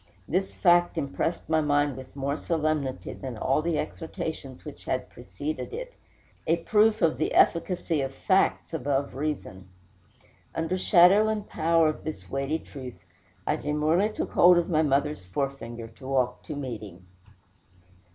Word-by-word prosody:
This 190 +3 -1
fact 175 -1 +4
impressed 160 +3 -2
my 160 0 +2
mind 145 -2 +2
with 130 +1 -11
more 140 +1 -1
solemnity 155 -5 -1
than 130 -4 -7
all 135 +7 +1
the 165 -1 0
exhortations 155 -5 -5
which - - -10
had - - -2
preceded 145 - -6
it - - -6 0.5
a 165 - +4
proof 215 +4 +3
of 165 - +2
the 155 - 0
efficacy 170 -2 +2
of 135 0 -2
facts 185 +4 +1
above 140 -2 -1
reason. 135 -10 -4 0.9
Under 165 +3 -1
shadow 190 +4 +6
and 215 -1 -2
power 165 0 +3
of 155 - -2
this 155 - -6
weighty 140 +3 -1
truth, 130 -6 -10 0.4
I - - +1
demurely 155 +7 +1
took 215 - -4
hold 175 0 +7
of 175 +1 0
my 155 -1 +4
mother's 145 -6 0
forefinger 120 +1 -4
to 130 +4 -12
walk 130 -2 0
to 150 - -5
meeting. 105 -10 -7
150 Hz, 150 wpm, -27 LUFS, 135-170 Hz, 0.9 s, hold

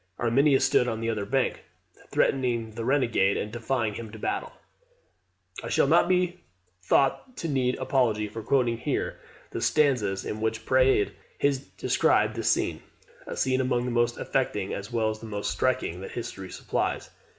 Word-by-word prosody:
Arminius 135 +3 +3
stood 125 -2 +3
on 115 -2 -2
the 115 0 -1
other 105 -3 -3
bank, 135 +1 0 0.5
threatening 120 -4 +1
the 115 +1 -5
renegade, 115 -7 +2
and 105 - -3
defying 120 -1 -1
him 110 +1 -7
to 110 - -9
battle. - - -3 1.1
I - - -5
shall - - +3
not - - +4
be 180 -1 +1 0.4
thought 140 - +1
to 165 - -3
need 130 -4 +1
apology 110 -6 +1
for 110 +2 -7
quoting 120 0 +1
here - - -2 0.3
the - - -4
stanzas 120 -11 +2
in 110 - -4
which 110 0 -2
Praed 130 -4 +3 0.3
has 140 -2 +2
described 140 - +1
this - - 0
scene - - 0 0.5
a - - -5
scene 130 0 +2
among 125 -1 0
the 125 - -2
most 120 0 +1
affecting, 105 -7 -1
as 100 +4 -6
well 110 -2 +1
as 110 - -7
the 115 - -9
most 105 -1 -3
striking, 110 -8 -1
that 95 - -8
history 95 -5 -6
supplies. - - -2
120 Hz, 170 wpm, -27 LUFS, 110-130 Hz, 1.1 s, not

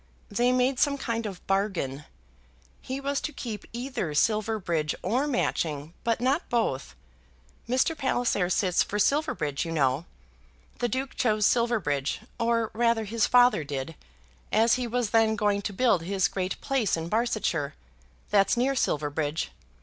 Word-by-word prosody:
They 240 +4 +2
made 255 +1 +2
some 280 -1 +2
kind 230 -4 -2
of 190 -3 -9
bargain; 190 -8 -1 0.8
he 265 +1 -4
was 280 0 -1
to 305 - -3
keep 220 -8 -6
either 235 - -3
Silverbridge 205 -5 +1
or 260 +6 +1
Matching, 160 - -1
but 230 -1 +1
not 265 +7 0
both. 135 - -1 0.7
Mr. 260 +6 +2
Palliser 245 - 0
sits 185 -1 +2
for 205 - -1
Silverbridge, 210 - +1
you 165 - -5
know. 140 0 +1 0.7
The 240 - 0
Duke 260 +3 -2
chose 215 -4 +1
Silverbridge, 205 - +1 0.2
or 230 -1 +1
rather 230 0 +2
his 220 +1 +1
father 245 -9 +5
did, 140 +2 -4 0.6
as 225 +1 +4
he 250 -1 0
was 235 -2 -1
then 225 -1 +4
going 205 -1 +1
to 205 - -3
build 205 -3 +2
his 190 +2 +1
great 185 -1 -3
place 255 -10 +1
in 165 0 -4
Barsetshire; 210 -8 0 0.6
that's 200 +3 +4
near 260 +3 +2
Silverbridge. 150 - -1
220 Hz, 145 wpm, -27 LUFS, 170-245 Hz, 0.8 s, father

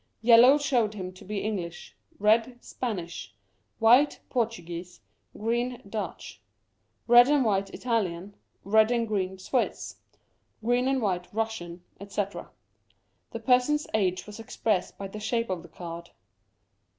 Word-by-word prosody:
Yellow 240 +4 +8
showed 245 -7 +1
him 185 -2 -6
to 185 - -14
be 205 +1 -4
English; 180 -6 -5 0.2
red, 225 +4 +2
Spanish; 175 - -5 0.4
white, 245 +6 +5
Portuguese; 180 -8 -3 0.4
green, 240 +3 -1
Dutch; 210 +1 -6 0.6
red 240 +1 +8
and 290 -3 +3
white, 195 -2 +1
Italian; 200 -6 -2 0.3
red 220 +2 +4
and 235 -1 0
green, 190 -3 -2
Swiss; 245 +7 -2 0.7
green 245 +2 +2
and 265 -2 +1
white, 180 -3 -2
Russian; 200 -6 -4 0.2
etc. 200 0 -4 0.8
The - - -7
person's 265 +4 +3
age 185 -4 0
was 210 +1 -10
expressed 220 -3 -2
by 195 - -5
the 210 +2 -8
shape 230 0 -1
of 180 -2 -3
the 175 - -14
card. 170 0 -8
215 Hz, 125 wpm, -27 LUFS, 185-240 Hz, 0.8 s, Yellow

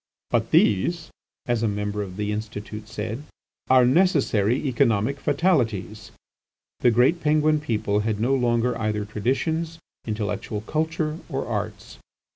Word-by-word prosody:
"But - - +1
these," 160 - +2 0.3
as 120 -4 0
a 115 - +2
member 105 0 -2
of 95 -2 -6
the 105 0 -1
Institute 105 0 -6
said, 110 +3 -5 0.5
"are 130 -1 +6
necessary 130 - +3
economic 125 0 +1
fatalities." 115 - 0 0.7
The 125 - +4
great 125 +9 +3
Penguin 155 0 +3
people 110 -7 0
had 105 -1 -1
no 125 +5 +2
longer 120 -1 +1
either 105 -1 -1
traditions, 160 +10 -1 0.3
intellectual 105 0 -3
culture, 155 +4 -2
or 135 -3 -2
arts. 105 - -5
115 Hz, 125 wpm, -24 LUFS, 105-145 Hz, 0.7 s, are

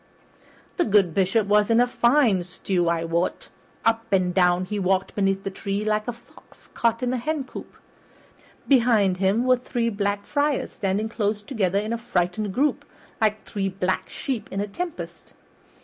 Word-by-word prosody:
The 350 - +3
good 200 -5 +3
Bishop 195 +4 +2
was 210 +1 +3
in 230 0 +4
a 245 - +5
fine 240 -5 +3
stew, 180 0 -1
I 170 -1 0
wot. 170 +2 -2 0.4
Up 225 0 +1
and 185 -2 +2
down 180 0 +3
he 205 +2 -3
walked 190 0 0
beneath 195 -1 0
the 195 - -3
tree 200 +1 -3
like 215 +1 0
a - - 0
fox 235 0 -20
caught 230 +1 0
in 250 0 0
a - - 0
hencoop. 285 0 -5 0.9
Behind 230 -8 +4
him 195 +6 +1
were 255 0 +4
three 240 -1 -2
Black 205 -1 -2
Friars 290 -1 0
standing 200 +2 -1
close 210 -2 -2
together 200 -6 0
in 215 +3 -1
a 235 - -3
frightened 200 -1 -1
group, 285 +8 0 0.4
like 215 0 +1
three 195 -2 -2
black 185 0 -2
sheep 255 -5 -4
in 195 - -3
a 205 - 0
tempest. 340 - -7
210 Hz, 170 wpm, -24 LUFS, 190-235 Hz, 0.9 s, a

